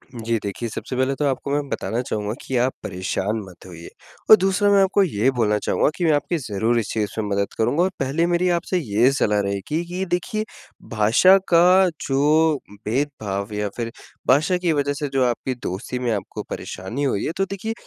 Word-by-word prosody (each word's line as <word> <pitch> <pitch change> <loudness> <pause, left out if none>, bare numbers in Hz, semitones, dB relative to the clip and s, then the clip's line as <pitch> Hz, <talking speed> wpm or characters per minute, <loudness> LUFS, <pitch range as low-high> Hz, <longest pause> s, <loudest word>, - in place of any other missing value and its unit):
जी, 115 0 -1
देखिए, 105 +4 -4
सबसे 125 - -6
पहले 130 +1 +1
तो 145 - -1
आपको 140 0 -1
मैं 145 0 -1
बताना 115 +1 -2
चाहूँगा 105 -4 -3
कि 130 - -3
आप 125 +2 +1
परेशान 95 +4 -2
मत 90 -2 -15
होइए। 85 -2 -10 0.4
और 215 - +12
दूसरा, 195 +2 +2
मैं 200 -1 +5
आपको 195 +1 +3
ये 130 - +1
बोलना 110 -4 +1
चाहूँगा - - +1
कि 175 - -1
मैं 160 - +4
आपकी 150 +4 0
ज़रूर 115 -2 0
इस 105 - -3
चीज़ 105 -2 -1
में 110 - -1
मदद 100 0 -1
करूँगा 145 +9 +2
और 185 - +2
पहले 140 +5 0
मेरी 175 +1 +1
आपसे 180 +2 -2
ये 120 0 +2
सलाह 105 -6 +1
रहेगी 100 - -2
कि 180 +2 -3
देखिए, 190 +5 -2 0.5
भाषा 115 - +5
का 180 +2 +6 0.2
जो 150 +3 +3 0.3
भेदभाव 110 -5 -2
या 105 0 -2
फिर 115 -1 -3 0.4
भाषा 155 +7 +3
की 175 -2 0
वजह 145 -1 0
से 145 0 -3
जो 135 -1 +2
आपकी 125 +2 -1
दोस्ती 95 +7 -4
में 120 -2 -1
आपको 100 -3 -4
परेशानी 95 +10 -5
हुई 130 -8 0
है, - - -1
तो 195 - +1
देखिए, 200 +4 -4
130 Hz, 200 wpm, -22 LUFS, 105-170 Hz, 0.5 s, और